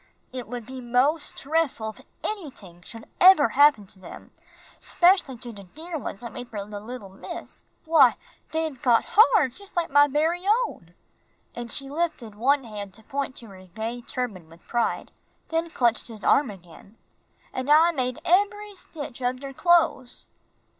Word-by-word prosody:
"It 250 Hz, -4 st, -6 dB
would 240 Hz, 0 st, -6 dB
be 260 Hz, +1 st, -8 dB
mos' 255 Hz, +6 st, +1 dB
drefful 280 Hz, -7 st, -1 dB
if -, -, -17 dB, 0.2 s
anyting 260 Hz, -, -6 dB
should 225 Hz, +3 st, -10 dB
eber 365 Hz, -5 st, +7 dB
happen 285 Hz, -6 st, +5 dB
to 190 Hz, 0 st, -12 dB
dem, 185 Hz, -, -12 dB, 0.5 s
'specially 350 Hz, -8 st, +3 dB
to 240 Hz, 0 st, -6 dB
der 310 Hz, -, -8 dB
ones 205 Hz, -, -7 dB
I 235 Hz, -, -5 dB
made 245 Hz, 0 st, -9 dB
fer 205 Hz, -3 st, -6 dB
de 210 Hz, -1 st, -7 dB
little 220 Hz, -1 st, -8 dB
miss. 190 Hz, -, -9 dB, 0.2 s
Why, 310 Hz, -6 st, +5 dB, 0.3 s
dey've 320 Hz, -4 st, -3 dB
got 240 Hz, -5 st, +3 dB
har 435 Hz, -, +5 dB
jus' 390 Hz, +11 st, -14 dB
like 345 Hz, -4 st, -1 dB
my 290 Hz, +1 st, +6 dB
bery 320 Hz, +5 st, 0 dB, 0.2 s
own." 175 Hz, -, -12 dB, 0.6 s
And 235 Hz, -1 st, -6 dB
she 275 Hz, -, -4 dB
lifted 285 Hz, -7 st, -3 dB
one 270 Hz, +6 st, +2 dB
hand 205 Hz, -4 st, -8 dB
to 220 Hz, -, -14 dB
point 275 Hz, +2 st, -4 dB
to 230 Hz, -, -8 dB
her 185 Hz, -1 st, -14 dB
gay 225 Hz, +6 st, -5 dB
turban 225 Hz, -9 st, -5 dB
with 165 Hz, +1 st, -19 dB
pride, 240 Hz, -1 st, -1 dB, 0.4 s
then 330 Hz, +1 st, -1 dB
clutched 240 Hz, -6 st, +1 dB
his 220 Hz, -3 st, -9 dB
arm 280 Hz, -4 st, +4 dB
again, 195 Hz, +2 st, -14 dB, 0.6 s
"An' 260 Hz, +2 st, -4 dB
I 320 Hz, +3 st, +6 dB
made 255 Hz, -5 st, -2 dB
eb'ry 410 Hz, +3 st, +1 dB
stitch 295 Hz, -8 st, -9 dB
ob 250 Hz, +1 st, -1 dB
der 275 Hz, -1 st, -7 dB
cloes." 330 Hz, -6 st, +2 dB
255 Hz, 165 wpm, -25 LUFS, 220-315 Hz, 0.6 s, eber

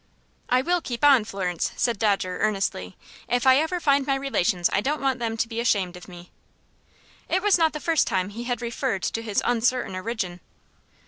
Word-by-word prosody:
"I 255 Hz, +1 st, +3 dB
will 355 Hz, +2 st, +1 dB
keep 245 Hz, -3 st, -6 dB
on, 270 Hz, -7 st, +6 dB
Florence," 185 Hz, -5 st, -3 dB
said 235 Hz, -4 st, 0 dB
Dodger, 195 Hz, -4 st, 0 dB
earnestly. 195 Hz, -, -1 dB, 0.3 s
"If 245 Hz, +2 st, 0 dB
I 260 Hz, 0 st, +7 dB
ever 320 Hz, +4 st, 0 dB
find 280 Hz, -4 st, +2 dB
my 275 Hz, -, +2 dB
relations 215 Hz, -10 st, +1 dB
I 195 Hz, -, +2 dB
don't 295 Hz, +6 st, -1 dB
want 265 Hz, -2 st, 0 dB
them 225 Hz, -1 st, -2 dB
to 230 Hz, -, 0 dB
be 230 Hz, 0 st, -5 dB
ashamed 200 Hz, -6 st, 0 dB
of 180 Hz, -, -12 dB
me." 175 Hz, -1 st, -12 dB, 1.0 s
It 375 Hz, -, +1 dB
was 415 Hz, -2 st, +5 dB
not 320 Hz, -1 st, +3 dB
the 300 Hz, -, -4 dB
first 325 Hz, 0 st, +1 dB
time 185 Hz, 0 st, 0 dB
he 230 Hz, +4 st, -7 dB
had 245 Hz, -1 st, -3 dB
referred 230 Hz, -5 st, -2 dB
to 225 Hz, -, -2 dB
his 215 Hz, -3 st, -1 dB
uncertain 245 Hz, -2 st, +1 dB
origin. 185 Hz, -3 st, -4 dB
235 Hz, 195 wpm, -24 LUFS, 195-270 Hz, 1.0 s, I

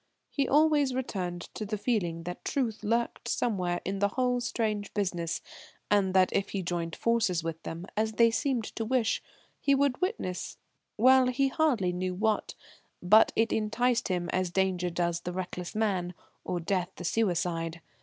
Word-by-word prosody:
He 280 Hz, -, 0 dB
always 295 Hz, -3 st, +3 dB
returned 185 Hz, -9 st, -3 dB
to -, -, -5 dB
the 215 Hz, +1 st, -3 dB
feeling 190 Hz, -7 st, -1 dB
that 175 Hz, +1 st, -6 dB
truth 230 Hz, -6 st, -1 dB
lurked 230 Hz, +2 st, -1 dB
somewhere 180 Hz, -7 st, 0 dB
in 195 Hz, +1 st, -2 dB
the 200 Hz, -, +3 dB
whole 250 Hz, +3 st, 0 dB
strange 215 Hz, -3 st, -2 dB
business, 175 Hz, -5 st, -1 dB, 0.5 s
and 195 Hz, -2 st, +3 dB
that 185 Hz, -1 st, +4 dB
if 200 Hz, -, 0 dB
he 195 Hz, -2 st, -3 dB
joined 170 Hz, -1 st, -3 dB
forces 220 Hz, -8 st, +1 dB
with 165 Hz, 0 st, -4 dB
them, 165 Hz, +2 st, -6 dB
as 220 Hz, +1 st, 0 dB
they 230 Hz, +1 st, +5 dB
seemed 240 Hz, +2 st, 0 dB
to 225 Hz, -, 0 dB
wish, 235 Hz, 0 st, +1 dB, 0.4 s
he 280 Hz, -, +3 dB
would 275 Hz, 0 st, +1 dB
witness 365 Hz, -, -2 dB, 0.4 s
well, 260 Hz, +3 st, +6 dB
he 270 Hz, +2 st, +2 dB
hardly 250 Hz, -, +1 dB
knew 180 Hz, 0 st, -2 dB
what 215 Hz, +2 st, 0 dB, 0.5 s
but 215 Hz, +5 st, +6 dB
it 225 Hz, 0 st, +2 dB
enticed 235 Hz, +3 st, +1 dB
him 180 Hz, -2 st, -1 dB
as 185 Hz, -1 st, +1 dB
danger 180 Hz, -1 st, 0 dB
does 170 Hz, 0 st, -1 dB
the 175 Hz, +1 st, -5 dB
reckless 180 Hz, 0 st, -5 dB
man, 190 Hz, -5 st, 0 dB, 0.3 s
or 180 Hz, -, -2 dB
death 180 Hz, +1 st, -1 dB
the 175 Hz, -, -7 dB
suicide. 170 Hz, -5 st, 0 dB
200 Hz, 165 wpm, -29 LUFS, 180-235 Hz, 0.5 s, well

